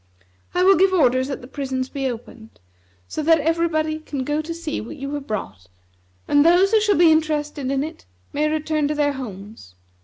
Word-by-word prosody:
I 360 - +3
will 385 +1 +6
give 380 +2 +4
orders 260 -6 +3
that 275 - -5
the 245 - -11
prisons 260 -2 -3
be 270 -1 -3
opened, 225 -1 -10 0.5
so - - -4
that 320 +1 +4
everybody 315 0 0
can 285 -4 -5
go 295 +3 -1
to 315 +2 -7
see 330 -2 -4
what 235 +8 -9
you 275 +1 -5
have 290 -1 -5
brought; 95 - -5 0.6
and 290 0 +4
those 355 +4 +5
who 440 -1 +4
shall 415 -1 +2
be 335 -1 +6
interested 300 -3 0
in 275 0 0
it 310 - -9 0.3
may 300 +1 +1
return 310 -1 0
to 300 - -2
their 290 -1 +1
homes. 205 - -9
295 Hz, 195 wpm, -22 LUFS, 260-320 Hz, 0.6 s, will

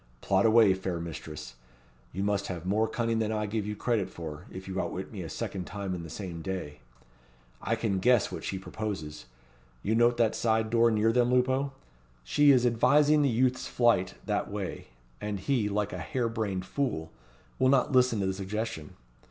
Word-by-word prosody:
Plot 95 - +2
away, 110 -3 +6
fair 95 -2 -3
mistress; 80 -6 -7 0.6
you 95 - -3
must 100 -1 0
have 90 -2 -5
more 105 +4 +2
cunning 115 -1 -1
than 110 -1 0
I 105 -1 -1
give 105 0 -2
you 105 - -3
credit 110 -3 0
for, 80 -3 -8
if 95 +1 -8
you 95 0 -2
outwit - - -5
me - - -6
a - - -6
second 95 -2 -4
time 100 -1 -4
in 90 - -4
the 80 - -8
same 85 -1 -6
day. 80 -6 -5 0.8
I 115 - 0
can 110 -4 -1
guess 120 +2 +3
what - - -6
she 95 - -3
proposes. 95 - -5 0.6
You 110 - +1
note 120 +1 +4
that 115 -2 +3
side 110 -1 +1
door 115 0 +5
near 110 0 +3
them, 120 +1 +2
Lupo? 130 +2 +2 0.5
She 145 - +4
is 125 -3 +6
advising 145 +6 +4
the 140 - +3
youth's 125 +2 +1
flight 115 -7 +2
that - - -1
way; - - -5 0.3
and 105 -1 -3
he, 110 0 0
like 105 -1 -1
a 90 - -4
hair 120 +8 -1
brained 105 -5 -2
fool, 95 - -2 0.5
will 130 0 +4
not 130 -2 +3
listen 125 -4 +4
to - - 0
the 95 - 0
suggestion. 100 -4 -4
105 Hz, 190 wpm, -29 LUFS, 95-120 Hz, 0.8 s, away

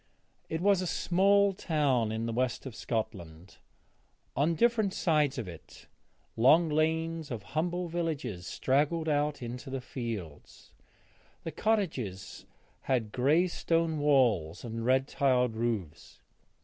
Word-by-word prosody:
It 160 +1 -2
was 200 -1 +3
a 185 - -2
small 195 +4 +3
town 140 - 0
in 110 +1 -2
the 115 - -2
west 125 +2 -1
of 130 - -6
Scotland. 95 -7 -5 0.8
On 155 +5 +2
different 220 -2 +2
sides 150 -5 +1
of 115 -6 -4
it 85 -3 -12 0.5
long 155 +8 +5
lanes 160 +1 0
of 115 -5 -5
humble 175 +3 -1
cottages 140 - -3
straggled 150 +5 0
out 145 -2 0
into 125 +2 -6
the 135 0 -3
fields; 115 - -7 0.7
the 165 - -4
cottages 130 - -2 0.4
had 120 -5 +1
grey 145 +9 +3
stone 165 -3 0
walls 120 - +2
and 115 0 -5
red 130 +1 +3
tiled 125 -5 +1
roofs. 110 -9 -4
135 Hz, 125 wpm, -30 LUFS, 115-165 Hz, 0.8 s, long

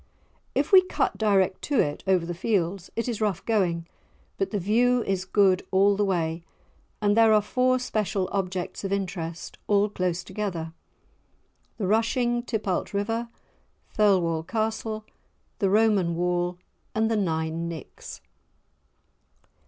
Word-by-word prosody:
If - - 0
we 380 -2 +9
cut 370 - -2
direct 195 -4 +2
to 285 -5 +1
it, 145 - 0
over 185 -3 +3
the 175 - -4
fields, 185 -1 -1
it 230 - -2
is 230 -3 -3
rough 205 -5 -1
going, 180 -7 +1 0.5
but 390 - 0
the 210 - -2
view 235 +6 +2
is 190 -1 -2
good 190 -1 +3
all 200 +2 +4
the 205 - +1
way. 165 -4 -1 0.6
And 205 0 +3
there 225 -1 +6
are 215 -1 +5
four 255 +4 +2
special 215 -6 -1
objects 190 -1 -3
of 195 - -3
interest, 175 -4 -4
all 205 0 +3
close 180 -2 -2
together; 185 -5 -4 1.0
the 205 - -2
rushing 240 +4 +1
Tipalt 215 -7 -2
river, 225 +4 -1 0.7
Thirlwall 180 -6 +3
Castle, 220 +3 -3 0.5
the 195 - +2
Roman 200 -5 +3
wall, 175 0 0 0.4
and 220 +1 +1
the - - +2
Nine 165 -3 -1
Nicks. 160 -4 -9
200 Hz, 135 wpm, -26 LUFS, 175-220 Hz, 1.0 s, we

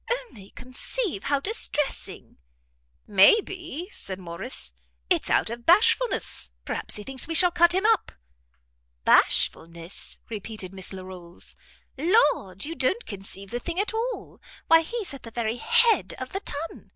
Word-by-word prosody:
Only 460 - -5
conceive 255 - -4
how 285 -1 +1
distressing!" 295 -5 -2 0.7
"May 200 - +6
be," 355 -4 -7
said 190 -1 -6
Morrice, 170 - -6 0.4
"it's - - +2
out - - +2
of 235 0 -7
bashfulness 445 +7 +3
perhaps - - -4
he 210 - -5
thinks 265 +2 0
we 330 - -2
shall 355 +2 +6
cut 345 0 +4
him 380 +2 +1
up." 445 -3 +2 0.9
"Bashfulness," 170 +2 +2
repeated 210 -3 -6
Miss 190 -1 -6
Larolles; 185 -2 -7 0.5
"Lord, 290 - +2
you 320 - -4
don't 330 - 0
conceive 195 0 -7
the 240 - -2
thing 345 +6 -4
at 415 +2 -1
all. 470 +3 -4 0.2
Why 325 0 +6
he's 415 +1 -5
at 275 - -9
the 230 - -9
very 230 0 -2
head 470 - +3
of - - -7
the 390 - -1
ton. 325 -3 -5
280 Hz, 145 wpm, -25 LUFS, -, 0.9 s, May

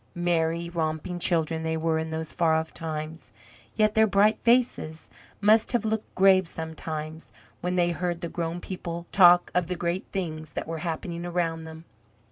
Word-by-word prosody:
Merry, 170 -1 0
romping 165 +1 -3
children 165 -2 0
they 160 0 -1
were 160 0 0
in 160 0 -3
those 160 0 -4
far 165 -2 +2
off 160 0 -2
times, 160 0 -6 0.4
yet 215 -1 +3
their 220 0 +5
bright 205 +2 +3
faces 235 -10 +1 0.3
must 215 +3 +4
have 235 -2 +1
looked 220 0 -3
grave 190 -1 +5
sometimes, 160 -1 -6 0.3
when 180 +1 -1
they 175 -1 +2
heard 175 0 -2
the 170 - -3
grown 170 +1 -4
people 170 -2 -6
talk 175 -2 +6
of 180 -2 +1
the 180 - -2
great 175 +2 -2
things 155 -5 -4
that - - -3
were 165 0 -4
happening 170 +1 -4
around 170 -2 -2
them. 160 +1 -10
170 Hz, 170 wpm, -26 LUFS, 160-180 Hz, 0.4 s, talk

